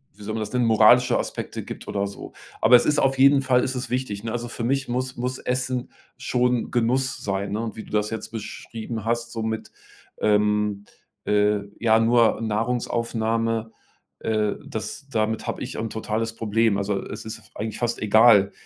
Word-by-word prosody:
wie 105 - -13
soll 110 +1 -4
man 110 - -2
das 105 - -4
nennen, 125 -1 +2
moralische 115 +2 +5
Aspekte - - -4
gibt - - -9
oder 100 -1 -1
so. 100 - -8 0.3
Aber 115 +3 +7
es 120 - +5
ist 150 0 +2
auf 135 0 +2
jeden 140 +1 +6
Fall 130 -2 +3
ist 130 - -2
es 125 - -4
wichtig, 125 -5 -3
ne? 115 - -3
Also 120 0 -3
für 120 0 -6
mich 135 +3 0
muss 125 +1 -2
muss 125 +1 -2
Essen 125 0 -2 0.3
schon 125 -1 0
Genuss 125 +2 0
sein, 100 0 -2
ne? 105 - -1
Und 115 -2 -4
wie 110 - -7
du - - -15
das 105 0 +1
jetzt 110 - -5
beschrieben 110 0 -6
hast, 120 0 -1
so 115 -1 -4
mit, 110 0 -3 0.5
ähm, 105 -1 +1 0.4
äh 105 0 +3 0.2
ja, 110 -1 +4
nur 115 0 +3
Nahrungsaufnahme, 115 0 -1 0.5
äh, 110 -2 0
das 140 - -6
damit 110 -3 -1
habe - - -3
ich 130 - -6
'n 110 0 -2
totales 110 +1 -3
Problem. 115 -1 +1
Also, 100 0 -1
es - - -7
ist 110 - -7
eigentlich 110 0 -4
fast 120 -1 -1
egal, 105 -2 +6
115 Hz, 185 wpm, -24 LUFS, 110-125 Hz, 0.5 s, Aber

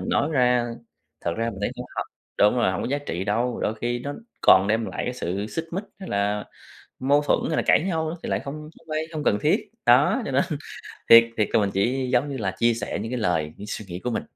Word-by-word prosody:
mình - - -5
nói 145 - +1
ra, 125 -3 +3 0.5
thật 85 - -1
ra 115 +1 -1
mình 100 - -9
thấy 100 - 0
cũng - - -6
h - - -4 0.4
đúng 105 +4 +5
rồi, 120 -6 +2
hổng - - -3
có - - -2
giá 140 +2 0
trị 95 -10 -4
đâu, 115 +4 0
đôi 110 - 0
khi 120 +2 -2
nó 140 +4 -5 0.3
còn 95 +1 +7
đem 110 +1 +1
lại - - -4
cái 125 - -2
sự 100 -3 -3
xích 160 +9 -4
mích, 190 +4 -3
hay 190 - -8
là 105 +1 0 0.6
mâu 140 +3 +3
thuẫn, 145 - +2
hay 155 - -1
là - - +1
cãi - - +4
nhau 160 -4 -1
nữa, 165 - -5
thì - - -4
lại - - 0
không 140 +1 -6 0.2
không 165 - -21
hay, 155 - 0
hông 155 -1 -3
cần 105 - +3
thiết. - - +1 0.2
Đó, - - +5
cho - - -3
nên - - +3 0.7
thiệt 115 0 +10
thiệt 105 -2 +1
là - - +4
mình 100 -1 +1
chỉ, 125 +6 0
giống 125 +4 +2
như 140 - -4
là, 100 -6 -1
chia 115 0 +3
sẻ 115 - -4
những 115 +3 -5
cái 125 - -1
lời, 80 -8 0
những 105 - -9
suy 105 +1 -5
nghĩ 90 0 -6
của 125 - 0
mình, 115 - -1
120 Hz, 270 wpm, -24 LUFS, 105-140 Hz, 0.7 s, thiệt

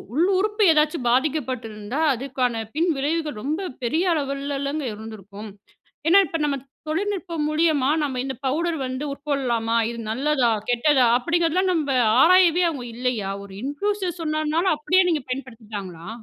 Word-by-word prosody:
உள் 340 +4 +3
உறுப்பு 420 +1 +1
ஏதாச்சும் 300 -4 +1
பாதிக்கப்பட்டிருந்தா, 255 -3 -1
அதுக்கான 250 -3 -2
பின்விளைவுகள் 310 -4 0
ரொம்ப 325 +7 -2 0.2
பெரிய 340 +8 +1
அளவிலங்க 280 0 -2
இருந்திருக்கும். 210 -1 -9 0.6
ஏன்னா, 380 +4 +7
இப்ப 330 - -2
நம்ம 280 -1 0 0.3
தொழில்நுட்பம் 355 -3 -2
மூலியமா 305 -3 +2
நம்ம 265 -3 -2
இந்த 265 -2 -4
பவுடர் 330 +4 0
வந்து 260 +3 -4
உட்கொள்ளலாமா? 250 -6 -1
இது 235 - -7
நல்லதா! 265 -1 +1 0.2
கெட்டதா! 255 +1 +3
அப்பிடிங்கிறதலாம் 345 +5 +1
நம்ம 310 -4 -1 0.3
ஆராயவே 360 0 +5
அவுங்க 250 -5 -6
இல்லயா? 235 -5 -2
ஒரு 195 - -13
இன்ஃப்ளூயன்சர் 365 +5 -2
சொன்னனால 310 +3 +1
அப்பிடியே 365 +5 +3
நீங்க 305 -4 0
பயன்படுத்திட்டாங்களா? 215 -9 -7
285 Hz, 125 wpm, -23 LUFS, 245-330 Hz, 0.6 s, ஏன்னா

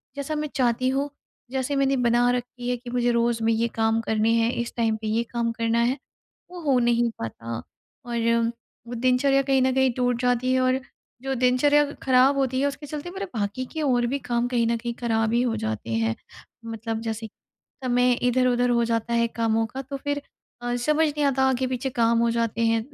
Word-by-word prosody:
जैसा 285 +2 -3
मैं 300 0 -2
चाहती 250 -1 +1
हूँ, 275 +2 0 0.4
जैसे 265 +1 -1
मैंने 275 0 +2
बना 240 0 +3
रखी 245 0 -4
है 250 - +1
कि 240 0 -10
मुझे 245 0 +1
रोज़ 235 -1 +1
में 225 - +3
ये 230 +1 +1
काम 225 0 +2
करने 220 0 +1
है, 230 0 +2
इस 235 - -5
टाइम 225 -2 +1
पे 220 - -4
ये 225 +2 +1
काम 235 0 -2
करना 230 0 0
है, 250 +3 +1 0.5
वो 360 -1 -8
हो 275 -5 +3
नहीं 235 -1 +2
पाता 115 +1 -5 0.5
और 235 -1 -2 0.7
वो 240 - -6
दिनचर्या 255 +3 +3
कहीं 270 -1 +2
न 260 0 +2
कहीं 265 -1 +3
टूट 245 -1 0
जाती 250 +1 +1
है 260 - +3
और 255 +1 +2 0.4
जो 270 0 -2
दिनचर्या 255 +4 +4 0.2
खराब 260 +1 +4
होती 260 -1 +1
है, 280 - +2
उसके 285 +1 -7
चलते 300 +4 -6
मेरे 390 +2 -5
बाकी 210 +3 -2
के 315 - -3
और 245 -4 +2
भी 275 +4 -1
काम 240 0 +1
कहीं 240 -2 +1
न 235 +1 +1
कहीं 235 +1 -4
खराब 225 -2 +1
ही 235 - +3
हो 235 -3 0
जाते 110 +1 -3
हैं। 115 0 +1 0.5
मतलब 225 0 -4
जैसे 225 0 -4 0.6
समय 245 0 +3
इधर-उधर 245 0 +2
हो 235 -1 +3
जाता 230 0 -1
है 235 0 +3
कामों 225 -1 0
का, 260 +5 -6
तो 275 +1 -6
फिर 285 +1 -3 0.4
अ, 245 0 -1
समझ 300 +6 +2
नहीं 295 0 -1
आता, 270 -1 +2
आगे 260 0 0
पीछे 255 +1 -2
काम 230 0 +4
हो 235 0 +2
जाते 230 -1 -1
हैं 225 0 +2
245 Hz, 210 wpm, -25 LUFS, 230-265 Hz, 0.7 s, दिनचर्या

